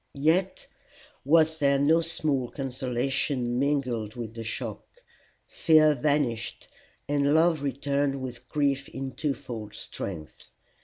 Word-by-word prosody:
Yet 175 +6 +1 0.6
was 160 +2 +3
there 140 -1 +3
no 155 +4 +4
small 150 -6 -1
consolation 130 -1 -2
mingled 130 -7 -1
with 115 -2 -6
the 115 0 -6
shock. 110 - -5 0.6
Fear 155 -2 +4
vanished, 135 -4 -1 0.4
and 145 0 +2
love 160 -1 +3
returned 140 0 -1
with 125 -1 -7
grief 140 -2 0
in 135 0 -5
twofold 120 -6 -4
strength. 80 -6 -7
140 Hz, 110 wpm, -27 LUFS, 125-150 Hz, 0.6 s, no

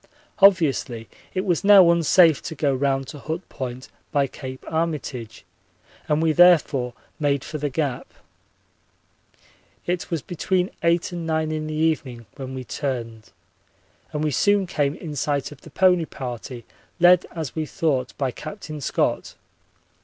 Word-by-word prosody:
Obviously 150 - +3 0.3
it 185 +2 -1
was 175 -1 0
now 195 -4 +8
unsafe 170 -1 +4
to 160 - -6
go 140 -1 +1
round 135 0 0
to 145 - -9
Hut 160 +5 -5
Point 130 -1 -6 0.2
by 145 -3 +2
Cape 130 -1 -9
Armitage 150 -8 -3 0.6
and 150 +1 +1
we 160 - +3
therefore 150 -7 +4 0.2
made 140 -2 +1
for 155 - -6
the 145 0 -1
Gap. 140 -2 -3 1.7
It 175 0 -2
was 165 -5 -2
between 180 +1 -1
eight 170 +1 +1
and 170 -2 -5
nine 160 -1 0
in 155 0 -3
the 155 - -4
evening 150 -7 -1
when 130 -1 -7
we 130 - -5
turned, 115 -5 -5 0.8
and 150 0 -2
we 155 - +1
soon 205 +6 +2
came 145 -5 -1
in 160 -4 -7
sight 145 0 -1
of 145 - -13
the - - -13
pony 180 -3 +3
party, 125 -3 -7 0.3
led 175 0 +6
as 160 -5 -4
we 155 -1 -2
thought 145 -9 -1
by 135 -3 -1
Captain 155 - -8
Scott. - - -1
155 Hz, 150 wpm, -23 LUFS, 135-170 Hz, 1.7 s, now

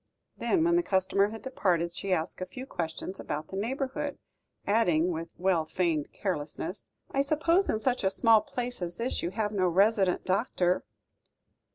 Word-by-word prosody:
Then, 345 -4 +1
when 340 +1 +4
the - - +4
customer 195 - +2
had 225 +1 -8
departed, 175 -10 0
she 195 +2 -4
asked 165 0 -1
a 185 - -3
few 255 +8 -8
questions 175 -2 -5
about 155 +1 -4
the - - -6
neighbourhood, 270 +6 -2 0.5
adding, 180 -6 +3
with 165 0 -5
well 180 -2 +2
feigned 165 -4 0
carelessness: 175 0 -4 0.2
"I 275 - +2
suppose 325 +6 +2
in - - +2
such 245 +2 0
a 190 - +4
small 225 +2 +5
place 245 +1 -5
as 175 0 -4
this 240 +2 -1
you 170 - -1
have 210 +2 -1
no 190 -3 +2
resident 195 +1 +3
doctor?" 185 -2 +1
195 Hz, 170 wpm, -29 LUFS, 175-245 Hz, 0.5 s, small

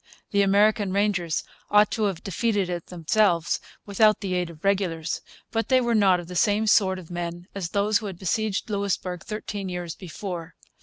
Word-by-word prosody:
The 200 - +3
American 200 0 +3
Rangers 195 -5 +1 0.3
ought 210 0 +5
to 215 0 0
have 195 -5 -2
defeated 200 -1 0
it 175 -1 -4
themselves, 175 0 +1 0.3
without 215 +1 +4
the 195 -2 -2
aid 180 -1 0
of 160 -2 -13
regulars. 180 -5 0 0.3
But 225 0 -1
they 260 -1 +5
were 240 -2 +1
not 190 -5 +4
the 180 +1 -8
same 210 +3 +2
sort 195 -3 +4
of 180 -2 -11
men 175 0 -4
as 190 -4 -4
those 205 +1 +2
who 215 - -6
had 190 -3 -7
besieged 205 +2 -1
Louisbourg 195 -3 -2
thirteen 205 -3 -5
years 175 -2 -4
before. 180 -2 -7
195 Hz, 175 wpm, -25 LUFS, 175-210 Hz, 0.3 s, ought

